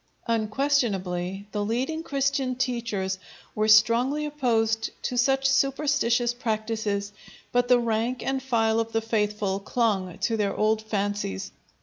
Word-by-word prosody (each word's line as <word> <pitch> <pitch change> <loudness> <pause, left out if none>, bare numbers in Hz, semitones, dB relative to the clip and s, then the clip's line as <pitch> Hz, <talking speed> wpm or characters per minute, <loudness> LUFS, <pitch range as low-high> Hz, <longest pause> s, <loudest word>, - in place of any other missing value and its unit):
Unquestionably 210 -6 0
the 205 -1 -1
leading 255 +9 -1
Christian 275 -3 0
teachers 230 -7 -2 0.3
were 215 0 0
strongly 240 +7 +4
opposed 225 -7 0
to 250 - -2
such 270 +2 +2
superstitious 270 -3 +2
practices, 215 -3 -2 0.4
but 245 0 +2
the 250 - +6
rank 235 +2 -1
and 270 0 -1
file 225 -4 +1
of 225 0 -2
the 225 - +1
faithful 210 -3 -1
clung 200 -4 -1
to 225 - 0
their 200 -2 0
old 215 +1 +2
fancies. 205 - -3
225 Hz, 125 wpm, -26 LUFS, 210-255 Hz, 0.4 s, the